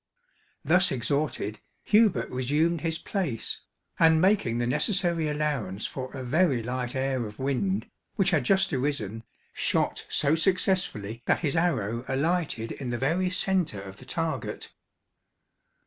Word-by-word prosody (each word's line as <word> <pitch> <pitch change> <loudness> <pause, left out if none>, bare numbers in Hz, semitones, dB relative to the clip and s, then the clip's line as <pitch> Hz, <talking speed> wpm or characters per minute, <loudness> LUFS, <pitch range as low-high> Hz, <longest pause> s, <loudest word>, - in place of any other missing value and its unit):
Thus 180 +5 +4
exhorted, 130 -5 -1 0.2
Hubert 210 - +4
resumed 150 +6 +1
his 165 -1 -1
place, 160 - -3 0.4
and 160 -1 +6
making 185 - +3
the 120 - 0
necessary 165 - +1
allowance 140 -10 -2
for 130 -1 -5
a 130 - -5
very 135 -2 +2
light 125 +1 -3
air 130 -3 0
of 105 - -11
wind, 140 +9 0 0.3
which 190 -1 +2
had 155 -6 +2
just 190 +5 +2
arisen, 125 -6 -2 0.3
shot - - 0
so 145 +1 +2
successfully 165 - 0
that - - +3
his 150 -3 0
arrow 120 - 0
alighted 140 -4 0
in 130 -3 -5
the 120 - -1
very 165 +9 +1
centre 185 - 0
of 95 0 -10
the - - -13
target. - - -3
145 Hz, 135 wpm, -27 LUFS, 120-175 Hz, 0.4 s, and